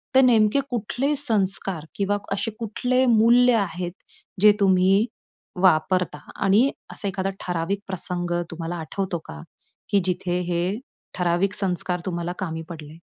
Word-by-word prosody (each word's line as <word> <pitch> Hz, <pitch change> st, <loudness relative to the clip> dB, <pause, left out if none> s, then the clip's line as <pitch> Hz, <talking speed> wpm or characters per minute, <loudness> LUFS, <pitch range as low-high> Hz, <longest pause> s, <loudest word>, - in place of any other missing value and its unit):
तर 265 Hz, -, +8 dB
नेमके 230 Hz, 0 st, +4 dB
कुठले 245 Hz, +5 st, -1 dB
संस्कार 195 Hz, -, +1 dB
किंवा 205 Hz, 0 st, 0 dB, 0.2 s
असे 220 Hz, +3 st, -2 dB
कुठले 245 Hz, +4 st, 0 dB
मूल्य 240 Hz, +2 st, +5 dB
आहेत, 180 Hz, -3 st, -2 dB, 0.5 s
जे 210 Hz, 0 st, +8 dB
तुम्ही 195 Hz, +2 st, +4 dB, 0.6 s
वापरता 180 Hz, -2 st, +2 dB, 0.2 s
आणि 210 Hz, +8 st, +4 dB, 0.2 s
असा 200 Hz, -, -2 dB
एखादा 195 Hz, 0 st, -2 dB, 0.2 s
ठराविक 180 Hz, +3 st, -1 dB
प्रसंग 175 Hz, -2 st, -4 dB, 0.2 s
तुम्हाला 165 Hz, +1 st, -5 dB
आठवतो 185 Hz, +2 st, -3 dB
का? 75 Hz, 0 st, -9 dB, 0.5 s
की 200 Hz, -1 st, +3 dB
जिथे 180 Hz, -1 st, -1 dB
हे 170 Hz, 0 st, 0 dB, 0.5 s
ठराविक 180 Hz, +3 st, 0 dB
संस्कार 180 Hz, -2 st, 0 dB
तुम्हाला 175 Hz, -2 st, -3 dB
कामी 165 Hz, -3 st, -3 dB
पडले? 155 Hz, -1 st, -9 dB
190 Hz, 130 wpm, -23 LUFS, 175-215 Hz, 0.6 s, तर